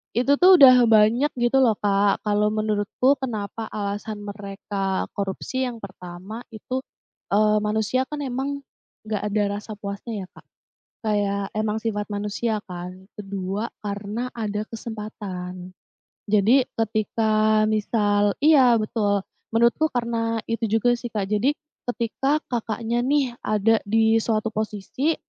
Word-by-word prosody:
itu 270 +4 +3
tuh 370 +1 +9
udah 255 -3 +9
banyak, 225 +7 +4
gitu 240 +3 +3
loh 225 -4 +4
Kak. 200 0 +2
Kalau 210 0 +2
menurutku 215 +5 +1
kenapa 220 -2 -4
alasan 205 +1 -4
mereka 200 -1 -3
korupsi 205 +6 -2
yang 235 -2 -6
pertama 185 +3 -8
itu, 255 +4 -4 0.5
eee, 210 +1 +4
manusia 220 +4 +1
kan 300 -1 -4
emang, 275 +2 -3 0.5
nggak 215 -1 -2
ada 210 0 +2 0.2
rasa 215 +1 -8
puasnya 200 0 -5
ya - - -19
Kak. - - -16 0.6
Kayak, 200 -2 0
emang 215 0 0
sifat 210 -2 -2
manusia 210 +2 -2
kan. 180 +1 -8
Ke-2, 200 +2 -3 0.2
karena 205 +5 -3
ada 210 -2 -2
kesempatan. 195 -5 -7 0.6
Jadi 215 +6 +5 0.2
ketika 215 0 +2
misal 205 -1 +2
iya, 265 -6 +6
betul. 210 -2 0 0.3
Menurutku 235 +7 +3
karena 230 -2 -1
itu 230 0 -2
juga 225 +2 +3
sih 240 - -5
Kak. 200 -3 -2
Jadi, 215 +7 +2 0.4
ketika 270 +5 0
Kakaknya 235 0 -2
nih, 270 -3 +1
ada 215 +1 +3
di 220 +1 +3
suatu 220 -1 0
posisi 215 +8 -1
215 Hz, 130 wpm, -24 LUFS, 205-235 Hz, 0.6 s, tuh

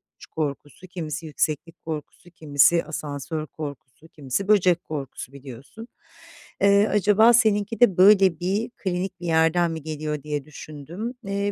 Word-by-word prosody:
uçuş - - -14
korkusu, 150 +3 -5
kimisi 165 -3 -6
yükseklik 160 +2 -3
korkusu, 160 +2 -7
kimisi 155 +1 +3
asansör 155 0 -5
korkusu, 145 0 -9
kimisi 150 +6 -4
böcek 180 -5 +3
korkusu 140 -3 -7
biliyorsun. 140 - -11 0.7
Eee, 200 +1 +5
acaba 210 +3 +4
seninki 220 -1 +2
de 220 -8 +4
böyle 190 -3 +6
bir 200 +6 -1
klinik 185 -2 -4
bir 175 - -8
yerden 165 +1 +2
mi 160 -1 -5
geliyor 150 -1 -4
diye 150 -2 -4
düşündüm. 155 - -8
Eee, 200 +1 -2
165 Hz, 135 wpm, -24 LUFS, 150-200 Hz, 0.7 s, böyle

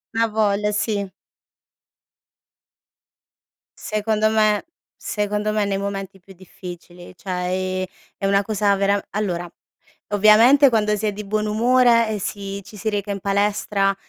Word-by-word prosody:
Avoglia, 210 -2 +1
sì. 210 -1 -1 2.7
Secondo 215 0 0
me 215 +1 +2 0.4
secondo 210 0 -2
me 215 -1 +1
nei 200 -1 -1
momenti 195 -1 -5
più 190 +2 -16
difficili 175 -1 -11
cioè, 185 +2 -7 0.5
ehm, - - -2 0.3
è - - -4
una 200 0 +3
cosa 205 -1 +1
veram 200 +1 +1
allora 180 -4 -3 0.6
ovviamente 220 +7 +6
quando 215 -3 +1
si 215 - -3
è 210 - 0
di 210 +1 -7
buon 215 +1 -1
umore 230 +1 +3
e 215 -1 -2
si 200 0 -5
ci 210 - -13
si 220 +2 -2
reca 205 -1 -3
in 200 - -3
palestra, 200 0 0
205 Hz, 130 wpm, -21 LUFS, 195-215 Hz, 2.7 s, ovviamente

